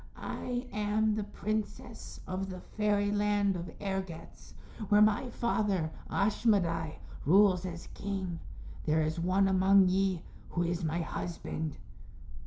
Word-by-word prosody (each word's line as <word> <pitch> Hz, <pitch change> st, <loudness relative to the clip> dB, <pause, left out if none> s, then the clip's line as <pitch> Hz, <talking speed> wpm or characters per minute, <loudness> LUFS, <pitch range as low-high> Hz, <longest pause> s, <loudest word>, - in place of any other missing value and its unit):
I 245 Hz, 0 st, -4 dB
am 210 Hz, +1 st, +1 dB
the 215 Hz, 0 st, -1 dB
princess 215 Hz, +2 st, -4 dB
of 190 Hz, +1 st, -3 dB
the 185 Hz, -1 st, -6 dB
Fairyland 205 Hz, -1 st, +1 dB
of 175 Hz, 0 st, -5 dB
Ergetz 190 Hz, -4 st, -5 dB, 0.3 s
where 205 Hz, -, +6 dB
my 215 Hz, +4 st, +4 dB
father, 205 Hz, -9 st, 0 dB, 0.2 s
Ashmedai, 195 Hz, -6 st, +1 dB, 0.3 s
rules 185 Hz, +2 st, +5 dB
as 170 Hz, -1 st, -7 dB
king. 190 Hz, -4 st, -3 dB, 0.5 s
There 155 Hz, +1 st, +3 dB
is 155 Hz, +2 st, -1 dB
one 185 Hz, +3 st, +3 dB
among 190 Hz, 0 st, +5 dB
ye 190 Hz, -2 st, +1 dB, 0.3 s
who 175 Hz, -, 0 dB
is 175 Hz, +1 st, -1 dB
my 165 Hz, +2 st, 0 dB
husband." 160 Hz, -2 st, -4 dB
195 Hz, 120 wpm, -31 LUFS, 175-210 Hz, 0.5 s, where